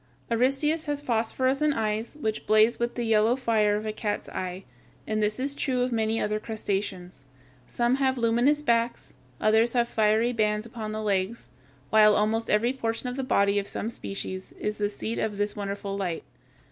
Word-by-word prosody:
Aristeus 275 +7 +1
has 290 -1 -1
phosphorescent 260 +3 +1
eyes, 220 +4 -2
which 220 -6 -3
blaze 215 +2 +4
with 235 0 -1
the 240 - -2
yellow 225 +1 +3
fire 220 -5 +2
of 210 +1 -3
a 215 - -2
cat's 210 -1 -3
eye, 185 +1 -5 0.4
and 215 0 -1
this 210 +2 0
is 275 +2 -1
true 260 -3 0
of 250 - -1
many 225 -1 0
other 210 0 0
crustaceans. 195 - -4 0.4
Some 240 +2 +1
have 265 -1 +1
luminous 240 +6 +2
backs; 235 -3 0 0.3
others 220 +2 +3
have 240 -1 +2
fiery 220 +2 +2
bands 210 -1 0
upon 225 -2 -6
the 215 0 -4
legs, 200 +2 -1 0.4
while 215 -1 +6
almost 220 +2 +1
every 230 +4 +2
portion 230 -1 -3
of 250 - -5
the 270 - -2
body 200 -5 +2
of 200 - -5
some 225 - -4
species 190 -3 -6
is 210 0 -3
the 205 0 +1
seat 220 +2 -4
of 210 -2 -2
this 205 0 -1
wonderful 200 -1 -4
light. 180 -4 -3
220 Hz, 180 wpm, -27 LUFS, 210-240 Hz, 0.4 s, while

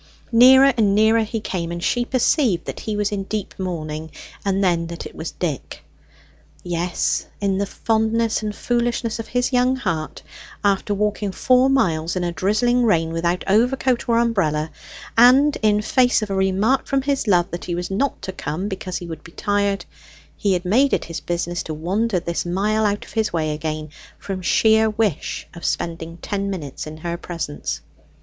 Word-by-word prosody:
Nearer 260 +3 +7
and 205 -3 +3
nearer 220 +2 +4
he 220 +1 -2
came, 175 -5 -3
and 170 0 -5
she 245 0 +1
perceived 245 - +1
that - - -6
he 215 -2 -3
was 205 0 0
in 205 -1 -2
deep 210 -1 -4
mourning, 160 -4 -4 0.3
and 195 0 +1
then 170 -3 +1
that 170 0 -7
it - - -9
was 160 - -5
Dick. 155 -7 -5 0.8
Yes, 175 0 -1
in 195 -1 0
the 200 - 0
fondness 225 +1 0
and 210 -1 -4
foolishness 235 -1 -1
of 225 - -5
his 245 +1 -1
young 250 +1 +3
heart, 170 -11 -3 0.4
after 200 0 +1
walking 210 0 -1
four 255 +6 +3
miles, 170 -11 +1
in 180 - -1
a 175 - -1
drizzling 215 +9 +1
rain 165 -8 +2
without 170 +2 0
overcoat 245 +4 +2
or 230 - +4
umbrella, 165 -10 +1 0.4
and 260 +5 +6
in 210 -1 +3
face 245 -1 +3
of 205 - -5
a - - 0
remark 190 +7 +1
from 275 -1 +1
his 275 -3 -1
love 180 -2 +3
that 175 - -5
he 175 - -2
was 175 +2 -4
not 260 +8 0
to 190 - -4
come 180 +1 -4
because 185 -2 -4
he 175 - -7
would 160 -2 -8
be 165 - -14
tired, 200 -1 0 0.5
he 200 -2 +1
had 180 0 -1
made 260 +9 +3
it - - +1
his 165 - -5
business 175 0 -2
to 155 - -5
wander 190 +6 0
this 170 0 -2
mile 210 +5 +1
out 205 0 -2
of - - -15
his 220 -2 0
way 155 -2 -1
again, 155 0 -4 0.3
from 190 -2 -5
sheer 220 +4 +4
wish 210 -7 -1
of 170 - -11
spending 165 0 -3
ten 200 +2 -3
minutes 155 -7 -5
in 155 0 -8
her 170 +2 -4
presence. 165 -4 -5
200 Hz, 185 wpm, -21 LUFS, 170-225 Hz, 0.8 s, Nearer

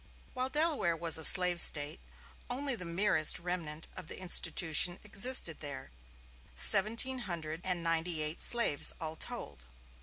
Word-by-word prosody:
While 255 0 -4
Delaware 295 - -3
was 165 0 -1
a - - -3
slave 180 0 +8
State, 145 +3 +1 0.5
only 270 +2 -4
the 180 -5 -10
merest 170 -2 0
remnant 165 -3 -5
of 185 -4 -13
the - - -9
institution 175 -1 +1
existed 205 - 0
there 140 - -10 0.6
seventeen 220 - +3
hundred 160 -1 -8
and 180 -2 -6
ninety 165 -1 -3
eight 150 +2 -6
slaves 235 -12 +1
all 160 -1 -8
told. 70 - -10
170 Hz, 140 wpm, -29 LUFS, 155-205 Hz, 0.6 s, slave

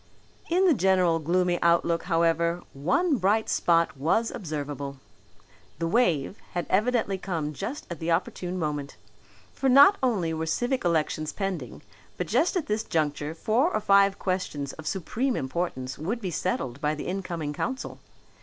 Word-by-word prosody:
In 365 +3 +3
the 350 - +6
general 185 - +3
gloomy 175 +2 +1
outlook, 170 0 +2
however, 170 0 +1
one 280 - +1
bright 210 +3 +2
spot 170 -3 +2
was 170 +12 +1
observable. 145 -4 -5 0.8
The 165 - -2
"wave" 175 - +1 0.2
had 175 -1 -2
evidently 215 -1 +1
come 160 -6 -3
just 220 - -5
at 170 -3 -7
the 165 - -3
opportune 180 +1 -1
moment. 150 -4 -3 0.6
For 270 - 0
not 285 +10 +8
only 200 -11 +1
were 160 0 -3
civic 245 +10 0
elections 155 -2 0
pending 195 -3 -4 0.3
but - - -2
just 360 - +1
at 340 - -1
this 210 +1 -1
juncture 150 -1 -1
four 240 - +1
or - - 0
five 200 -1 +4
questions 185 -7 -3
of 160 - -9
supreme 235 +8 -1
importance 130 -2 -3
would 200 +10 -2
be 190 -5 -4
settled 140 -7 -2
by 150 0 0
the 150 - -6
incoming 175 -5 -3
council. 260 - -4
175 Hz, 155 wpm, -27 LUFS, 155-210 Hz, 0.8 s, not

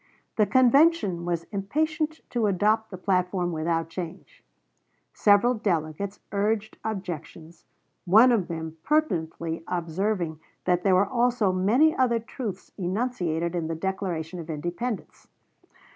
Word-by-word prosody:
The 210 -2 +3
convention 255 - +4
was 170 -1 -1
impatient 310 +10 -1
to 235 -3 +1
adopt 210 +3 +2
the 185 - -7
platform 180 -1 0
without 165 0 -1
change; 175 - -8 0.7
several 210 +4 +4
delegates 195 -2 -2
urged 210 +1 -1
objections, 170 -5 -6 0.4
one 220 +8 +7
of 215 -7 +1
them 160 -1 -5
pertinently 165 - -1
observing 175 -1 -2 0.3
that 180 -1 +2
there 190 0 +3
were 190 +2 +4
also 235 -2 +1
many 225 +13 +3
other 240 -3 +2
truths 225 -4 -7
enunciated 180 -4 -1
in 170 -2 -2
the 165 - -3
Declaration 180 -1 -3
of 165 -1 -8
Independence. 175 +9 -4
190 Hz, 120 wpm, -26 LUFS, 170-225 Hz, 0.7 s, one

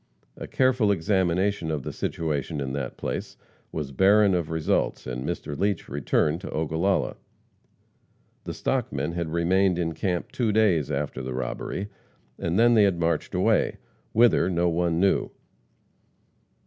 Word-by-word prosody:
A - - -8
careful 125 -5 +2
examination 95 -1 +1
of 75 -4 -2
the - - -5
situation 75 -2 -2
in 65 -1 -3
that 70 -3 -4
place - - -4 0.3
was 75 -3 -4
barren 100 +6 +4
of 85 -3 -1
results, 80 -1 0
and 65 0 -4
Mr. 70 - -4
Leach 100 +3 -1
returned 75 +4 0
to - - -7
Ogallala. 80 +5 0 1.3
The - - -4
"stockmen" 75 - -1
had 85 -1 -3
remained 90 +3 +2
in 85 -2 -1
camp 90 -1 -2
two 115 -4 0
days 100 -9 +2
after 70 -2 -3
the 65 -1 -5
robbery, 65 +10 -4 0.5
and 85 +2 -1
then 120 +1 +5
they 110 -3 +6
had 95 -4 +1
marched 85 -1 -1
away - - +2 0.3
whither 110 -6 +4
no 85 -1 +1
one 85 0 0
knew. 95 +1 +2
85 Hz, 145 wpm, -25 LUFS, 75-100 Hz, 1.3 s, they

